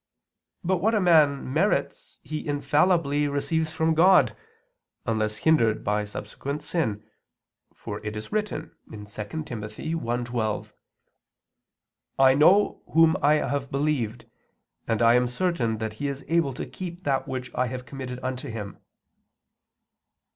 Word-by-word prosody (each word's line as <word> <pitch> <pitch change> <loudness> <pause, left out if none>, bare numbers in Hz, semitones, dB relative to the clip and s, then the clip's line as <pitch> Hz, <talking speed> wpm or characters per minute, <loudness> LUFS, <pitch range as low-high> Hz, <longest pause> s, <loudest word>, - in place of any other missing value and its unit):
But 185 +1 +1
what 220 +6 +1
a - - +3
man 150 -7 +3
merits, 210 - 0
he 155 -1 -5
infallibly 145 0 +2
receives 155 +3 -1
from 160 0 +1
God, 180 +4 +5 0.7
unless 110 -2 0
hindered 115 -6 +2
by 105 0 0
subsequent 140 +8 -6
sin; 110 - -2 0.7
for 105 0 -7
it 105 0 -4
is 105 - -7
written 210 0 -2 0.2
(2 110 - -9
Tim. - - -13 0.5
1:12): 120 -2 -3 1.5
"I 135 -1 +6
know 180 +9 +4
Whom 165 0 +6
I 145 +2 +5
have 140 -1 -2
believed, 135 -5 -1 0.6
and 115 0 +1
I 115 0 +6
am 125 0 +3
certain 125 -5 0
that 110 0 -4
He 145 - 0
is 140 0 -5
able 165 -6 +1
to - - -4
keep 180 -1 -8
that 135 -3 0
which 125 -2 -5
I 125 - 0
have 125 +1 -6
committed 130 -1 -6
unto 130 +2 -4
Him." 105 -3 -7
140 Hz, 135 wpm, -26 LUFS, 115-160 Hz, 1.5 s, I